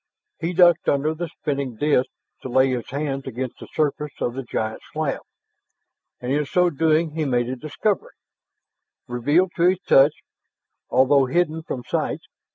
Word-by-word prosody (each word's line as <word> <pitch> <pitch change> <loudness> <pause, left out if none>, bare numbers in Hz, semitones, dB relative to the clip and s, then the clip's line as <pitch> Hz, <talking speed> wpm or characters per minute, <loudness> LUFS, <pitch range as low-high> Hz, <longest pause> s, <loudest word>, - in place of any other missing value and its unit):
He 170 +2 -2
ducked 175 -2 +5
under 145 +3 +1
the 170 +2 -4
spinning 140 -5 -3
disk 140 +1 +2 0.3
to 130 - -6
lay 130 +1 +3
his 125 -2 -3
hands 135 -1 -3
against 130 0 -5
the - - -10
surface 150 -1 -1
of 120 - -1
the 135 - -4
giant 110 -3 -3
slab. 155 -3 -2 1.0
And 125 +1 -4
in 150 +2 +2
so 180 +3 +2
doing 160 +1 +2
he 160 +1 -2
made 120 -4 +1
a 130 - -3
discovery, 155 - -2 0.9
revealed 145 +10 +2
to 175 +1 +5
his 185 0 0
touch 140 -1 +5 0.8
although 135 +1 +4
hidden 160 +2 0
from 130 -6 -5
sight. - - -2
145 Hz, 160 wpm, -23 LUFS, 130-160 Hz, 1.0 s, ducked